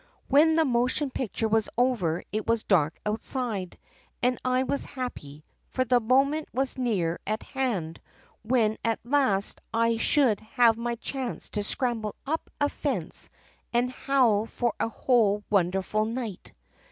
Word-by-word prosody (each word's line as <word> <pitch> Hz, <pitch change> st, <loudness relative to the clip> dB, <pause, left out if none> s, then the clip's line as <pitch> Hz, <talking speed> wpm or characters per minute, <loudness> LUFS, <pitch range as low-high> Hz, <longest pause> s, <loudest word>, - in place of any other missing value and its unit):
"When 310 Hz, +4 st, +5 dB
the 320 Hz, -1 st, +4 dB
motion 255 Hz, +3 st, +1 dB
picture 225 Hz, -3 st, -2 dB
was 220 Hz, 0 st, +1 dB
over 220 Hz, -10 st, +1 dB
it 215 Hz, +1 st, -3 dB
was 230 Hz, -1 st, +1 dB
dark 160 Hz, -5 st, +2 dB
outside 215 Hz, -3 st, -2 dB, 0.5 s
and 250 Hz, 0 st, +2 dB
I 255 Hz, 0 st, +2 dB
was 280 Hz, +2 st, 0 dB
happy, 155 Hz, -, -7 dB, 0.2 s
for 255 Hz, -, 0 dB
the 245 Hz, 0 st, +4 dB
moment 275 Hz, +6 st, +2 dB
was 265 Hz, +2 st, 0 dB
near 195 Hz, -10 st, -1 dB
at 215 Hz, +1 st, -2 dB
hand 205 Hz, -, -3 dB, 0.4 s
when 220 Hz, -1 st, +1 dB
at 225 Hz, -1 st, 0 dB
last 240 Hz, -6 st, +2 dB
I 230 Hz, 0 st, +2 dB
should 240 Hz, -3 st, +3 dB
have 230 Hz, +1 st, +3 dB
my 235 Hz, +1 st, -3 dB
chance 255 Hz, +1 st, -5 dB
to 210 Hz, -, +1 dB
scramble 220 Hz, -1 st, 0 dB
up 315 Hz, +4 st, -3 dB
a 290 Hz, -, +3 dB
fence -, -, -2 dB, 0.4 s
and 245 Hz, +1 st, +2 dB
howl 245 Hz, -6 st, +2 dB
for 240 Hz, 0 st, -1 dB
a -, -, 0 dB
whole 220 Hz, -4 st, +2 dB
wonderful 195 Hz, +2 st, +1 dB
night. 225 Hz, -4 st, -5 dB
235 Hz, 145 wpm, -27 LUFS, 210-255 Hz, 0.5 s, When